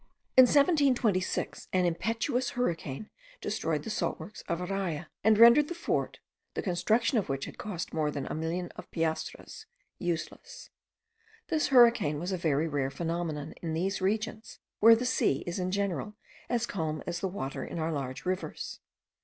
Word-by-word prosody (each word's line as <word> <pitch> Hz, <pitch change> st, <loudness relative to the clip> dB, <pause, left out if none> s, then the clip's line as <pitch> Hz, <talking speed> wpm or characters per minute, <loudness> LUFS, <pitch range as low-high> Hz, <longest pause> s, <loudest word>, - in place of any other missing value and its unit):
In 260 Hz, -, +10 dB
1726, 265 Hz, -, +2 dB
an 185 Hz, -1 st, +3 dB
impetuous 230 Hz, -, 0 dB
hurricane 170 Hz, -, -2 dB, 0.3 s
destroyed 160 Hz, -8 st, -2 dB
the 225 Hz, -, -4 dB
salt -, -, -1 dB
works 210 Hz, -, -9 dB
of 170 Hz, -, 0 dB
Araya, 180 Hz, -3 st, -3 dB, 0.2 s
and 215 Hz, 0 st, +5 dB
rendered 235 Hz, +6 st, +8 dB
the 345 Hz, -, -5 dB
fort, 340 Hz, -, -1 dB, 0.4 s
the -, -, -2 dB
construction 220 Hz, +6 st, +2 dB
of 200 Hz, -, -4 dB
which 135 Hz, 0 st, -2 dB
had -, -, -10 dB
cost 190 Hz, -5 st, -5 dB
more 155 Hz, -2 st, +1 dB
than 140 Hz, -2 st, -4 dB
a -, -, -4 dB
million 165 Hz, +3 st, -2 dB
of -, -, -10 dB
piastres, 160 Hz, -1 st, -3 dB, 0.3 s
useless. 185 Hz, -, -5 dB, 0.8 s
This 315 Hz, -3 st, +1 dB
hurricane 235 Hz, -, +5 dB
was 175 Hz, +4 st, -3 dB
a 185 Hz, -, 0 dB
very 155 Hz, -1 st, +1 dB
rare 140 Hz, -3 st, -1 dB
phenomenon 165 Hz, -1 st, -3 dB
in 165 Hz, -2 st, -3 dB
these 190 Hz, +4 st, -1 dB
regions, 215 Hz, +3 st, -2 dB, 0.2 s
where 225 Hz, +2 st, +8 dB
the 240 Hz, +2 st, -2 dB
sea 245 Hz, -, +1 dB
is 175 Hz, +2 st, -3 dB
in 180 Hz, 0 st, -1 dB
general 200 Hz, +2 st, -2 dB, 0.3 s
as 240 Hz, -1 st, +1 dB
calm 160 Hz, -8 st, -3 dB
as 170 Hz, -1 st, -3 dB
the 190 Hz, -, -1 dB
water 140 Hz, -8 st, -4 dB
in -, -, -6 dB
our 160 Hz, 0 st, -1 dB
large 135 Hz, -2 st, -4 dB
rivers. 185 Hz, +1 st, -3 dB
185 Hz, 165 wpm, -30 LUFS, 160-225 Hz, 0.8 s, In